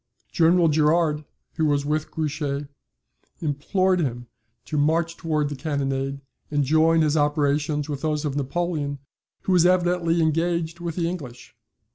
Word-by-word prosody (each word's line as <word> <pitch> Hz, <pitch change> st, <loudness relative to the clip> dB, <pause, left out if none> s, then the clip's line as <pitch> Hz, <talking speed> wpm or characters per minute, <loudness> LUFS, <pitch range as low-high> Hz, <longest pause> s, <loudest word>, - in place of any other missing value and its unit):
General 170 Hz, 0 st, +4 dB
Gerard, 155 Hz, 0 st, +2 dB, 0.3 s
who 160 Hz, -2 st, +2 dB
was 145 Hz, -1 st, +1 dB
with 150 Hz, +1 st, -1 dB
Grouchy, 145 Hz, -2 st, -2 dB, 0.7 s
implored 180 Hz, +5 st, +1 dB
him 120 Hz, -6 st, -2 dB, 0.4 s
to 155 Hz, -, -5 dB
march 160 Hz, +3 st, +1 dB
towards 150 Hz, -3 st, -1 dB
the -, -, -3 dB
cannonade, 135 Hz, -1 st, -2 dB, 0.3 s
and 145 Hz, -1 st, +1 dB
join 160 Hz, +3 st, +4 dB
his 155 Hz, -1 st, +2 dB
operations 150 Hz, 0 st, +1 dB
with 145 Hz, -3 st, -4 dB
those 155 Hz, -1 st, -1 dB
of 140 Hz, -2 st, -2 dB
Napoleon, 145 Hz, 0 st, -2 dB, 0.5 s
who -, -, -1 dB
was 180 Hz, -2 st, +5 dB
evidently 175 Hz, -2 st, +2 dB
engaged 165 Hz, +1 st, 0 dB
with 170 Hz, -2 st, -4 dB
the 170 Hz, -2 st, 0 dB
English. 130 Hz, -10 st, -7 dB
155 Hz, 140 wpm, -24 LUFS, 145-165 Hz, 0.7 s, was